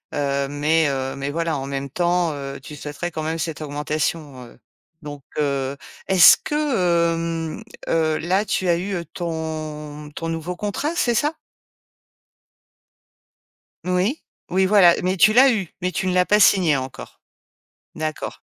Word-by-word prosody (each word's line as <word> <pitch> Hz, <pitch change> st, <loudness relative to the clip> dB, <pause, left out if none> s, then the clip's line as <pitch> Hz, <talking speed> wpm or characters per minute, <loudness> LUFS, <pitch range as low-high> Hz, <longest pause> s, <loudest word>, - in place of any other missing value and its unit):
heu, 140 Hz, -1 st, 0 dB
mais, 150 Hz, +2 st, +1 dB
heu, 135 Hz, -1 st, -3 dB
mais 140 Hz, +1 st, -3 dB
voilà 165 Hz, -1 st, -1 dB
en 135 Hz, 0 st, -5 dB
même 140 Hz, 0 st, -4 dB
temps, 175 Hz, +1 st, +1 dB
heu, 140 Hz, -1 st, -7 dB
tu 150 Hz, +1 st, -10 dB
souhaiterais 150 Hz, +4 st, -5 dB
quand 155 Hz, -1 st, -4 dB
même 160 Hz, +1 st, -2 dB
cette 160 Hz, -2 st, -3 dB
augmentation, 150 Hz, -2 st, -3 dB
heu, 120 Hz, -, -16 dB, 0.4 s
donc, 145 Hz, -2 st, -8 dB, 0.2 s
heu, 140 Hz, -2 st, -1 dB, 0.3 s
est-ce 185 Hz, -3 st, +8 dB
que, 295 Hz, -, -3 dB
hem, 170 Hz, -, 0 dB, 0.3 s
heu, 160 Hz, -1 st, +1 dB
là 190 Hz, +5 st, 0 dB
tu 185 Hz, -2 st, -1 dB
as 170 Hz, -, +3 dB
eu 180 Hz, -2 st, -3 dB
ton 155 Hz, -3 st, -5 dB
ton 165 Hz, +2 st, -5 dB
nouveau 165 Hz, +2 st, -4 dB
contrat, 240 Hz, -, -3 dB
c'est 240 Hz, -8 st, +1 dB
ça? 295 Hz, +7 st, 0 dB, 2.5 s
Oui, 185 Hz, -, 0 dB, 0.3 s
oui, 190 Hz, +1 st, +2 dB
voilà, 185 Hz, -4 st, +6 dB
mais 185 Hz, +1 st, +1 dB
tu 205 Hz, +4 st, +5 dB
l'as 255 Hz, +2 st, +6 dB
eu, 190 Hz, -6 st, -3 dB
mais 180 Hz, 0 st, -1 dB
tu 190 Hz, -, -2 dB
ne 180 Hz, -, +1 dB
l'as 180 Hz, 0 st, +3 dB
pas 210 Hz, +1 st, +3 dB
signé 175 Hz, -8 st, +5 dB
encore. 130 Hz, -1 st, -7 dB, 0.7 s
D'accord. 155 Hz, -1 st, -4 dB
165 Hz, 150 wpm, -22 LUFS, 145-185 Hz, 2.5 s, est-ce